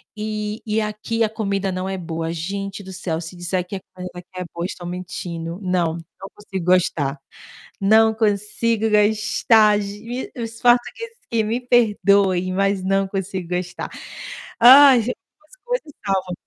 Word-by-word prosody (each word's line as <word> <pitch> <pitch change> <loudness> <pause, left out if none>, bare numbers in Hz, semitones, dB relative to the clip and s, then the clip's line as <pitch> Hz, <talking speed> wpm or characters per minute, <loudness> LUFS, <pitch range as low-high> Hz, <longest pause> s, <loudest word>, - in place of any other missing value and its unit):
e 215 0 -4
e 215 +1 +1
aqui 215 +2 -2
a 220 - +1
comida 200 -3 -2
não 185 +1 -3
é 190 - -3
boa, 165 -2 -4
gente 195 +4 -5
do 190 - -9
céu, 175 -3 -3
se 165 +2 -8
disser 175 +1 -2
que 195 +2 -5
a - - -10
comida 180 -1 -7
aqui 175 - -15
é 180 - -2
boa, 170 0 -3
estão 180 -1 -6
mentindo, 175 -1 -5
não, 180 -3 +1 0.3
não 195 - -8
consigo 195 -4 -6
gostar, 165 -6 +2 0.6
não 220 +3 +5
consigo 215 +1 0
gostar, 215 0 +4
ge 210 +5 -6
os 230 -2 -6
portugueses 250 - +1
aqui 230 -1 0
me 225 +3 -1
perdoem, 200 -6 +3
mas 195 0 +1
não 195 +1 +1
consigo 190 -2 -4
gostar. 180 0 -4 0.7
Ai, 265 +2 +9
algumas 250 - -7
coisas - - -3
salvam 190 -2 -1
200 Hz, 155 wpm, -21 LUFS, 180-220 Hz, 0.7 s, Ai